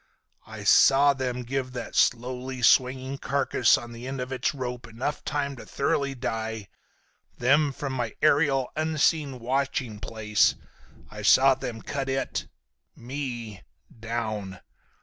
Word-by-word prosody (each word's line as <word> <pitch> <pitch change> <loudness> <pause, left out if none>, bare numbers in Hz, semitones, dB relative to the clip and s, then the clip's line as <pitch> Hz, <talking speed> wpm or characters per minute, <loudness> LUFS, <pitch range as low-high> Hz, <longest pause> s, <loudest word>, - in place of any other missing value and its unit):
"I - - -8
saw 140 +1 +6
them 125 -2 -3
give 130 +1 -3
that 120 -2 -6
slowly 125 +1 0
swinging 130 +3 +3
carcass 135 -3 +2
on 120 0 -8
the 120 +2 -8
end 135 0 -4
of 125 +1 -4
its 130 +2 0
rope 125 -2 -5
time 115 - -15
enough 140 +5 -3
to 140 -3 -3
thoroughly 140 0 -1
die, 110 -4 -4 0.7
then, 140 +4 +3
from 135 0 -5
my 120 -4 -3
aerial, 140 -4 +3
unseen 155 -3 +1
watching 125 -2 -2
place, 105 0 +1 0.6
I 105 - -8
saw 135 +6 +6
them 115 -3 -6
cut 135 -1 -3
it—me—down. 115 -6 -6
130 Hz, 125 wpm, -26 LUFS, 115-135 Hz, 0.7 s, saw